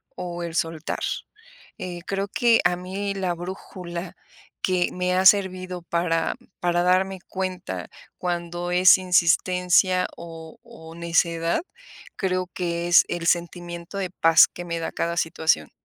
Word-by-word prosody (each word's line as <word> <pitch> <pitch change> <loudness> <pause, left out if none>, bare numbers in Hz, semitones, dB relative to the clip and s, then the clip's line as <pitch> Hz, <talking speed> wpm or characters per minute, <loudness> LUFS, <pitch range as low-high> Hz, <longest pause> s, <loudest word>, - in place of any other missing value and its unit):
o 175 -1 -5
el 170 -1 -5
soltar. 165 -2 -2 0.7
Eh, 180 -1 -6
creo 195 0 -1
que 230 +2 +3
a 175 0 +4
mí 190 +3 -4
la 185 -2 -1
brújula 175 0 -7 0.5
que 180 -1 +2
me 180 0 0
ha 185 +1 +2
servido 185 -2 +3
para 170 -1 0 0.2
para 175 0 +1
darme 190 +1 +2
cuenta 185 -1 -4 0.3
cuándo 175 0 -3
es 180 +1 +7
insistencia 180 +1 +3
o 165 -1 -10
o 160 0 -13
necedad, 170 - +1 0.6
creo 185 -1 0
que 170 -1 -2
es, 175 - +7
el 170 -1 -3
sentimiento 175 +1 -2
de 185 -2 -3
paz 165 -2 +6
que 175 - -9
me 170 -1 -3
da 165 - -3
cada 170 0 -2
situación. 160 - +1
175 Hz, 135 wpm, -24 LUFS, 170-185 Hz, 0.7 s, es